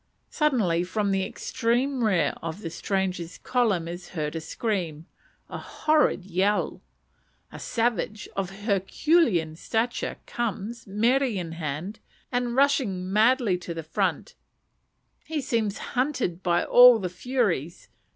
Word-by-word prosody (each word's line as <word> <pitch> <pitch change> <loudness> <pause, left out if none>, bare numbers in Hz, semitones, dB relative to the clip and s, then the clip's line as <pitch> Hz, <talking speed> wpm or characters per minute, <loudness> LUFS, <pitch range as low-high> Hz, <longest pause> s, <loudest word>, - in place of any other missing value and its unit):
Suddenly 215 - +2
from 200 +2 -1
the 195 -1 +1
extreme 250 +4 -1
rear 180 -9 +2
of 165 +4 -5
the 165 - -5
strangers' 185 -3 -2
column 215 -10 0
is 175 +1 -7
heard 150 0 -2
a 165 - -3
scream 170 -5 -3 0.4
a - - -6
horrid 305 - +1
yell. 195 +3 0 0.7
A - - -9
savage, 225 -2 -1
of 195 -2 -2 0.2
herculean 200 - +2
stature, 225 +7 -2
comes, 230 0 -4
mere 230 +7 +2
in 195 -11 -2
hand, 165 +5 -5 0.3
and 245 -1 -1
rushing 230 -10 +1
madly 220 -3 +3
to 170 -1 -6
the 165 - -5
front. 160 - -1 0.9
He 315 -1 -3
seems 230 -7 -1 0.2
hunted 250 - -1
by 175 -2 +2
all 245 -1 +8
the 195 -4 -3
furies. 180 - -2
205 Hz, 125 wpm, -26 LUFS, 175-245 Hz, 0.9 s, all